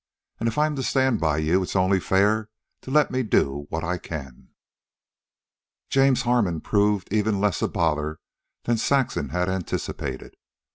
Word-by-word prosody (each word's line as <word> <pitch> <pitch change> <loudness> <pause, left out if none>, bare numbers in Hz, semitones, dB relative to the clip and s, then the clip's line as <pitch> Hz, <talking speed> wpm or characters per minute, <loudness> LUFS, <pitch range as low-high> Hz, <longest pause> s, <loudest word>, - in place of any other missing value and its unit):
And 115 - +1
if 115 - -7
I'm 150 0 +2
to - - -1
stand 130 -3 +1
by 80 -2 +1
you 80 +5 +2
it's 90 - -4
only 95 +1 +3
fair 105 +4 +1 0.3
to - - -10
let 150 +1 +3
me 130 - 0
do 70 - 0
what 80 +1 -3
I 90 0 -2
can." 65 -5 -8 1.4
James 135 -1 +3
Harmon 115 -9 +1
proved 100 +1 0
even 105 -1 +1
less 100 -3 0
a - - +2
bother 75 -1 -1 0.4
than 120 -1 +1
Saxon 130 - 0
had 90 +4 -1
anticipated. 95 -2 -4
100 Hz, 155 wpm, -24 LUFS, 80-120 Hz, 1.4 s, only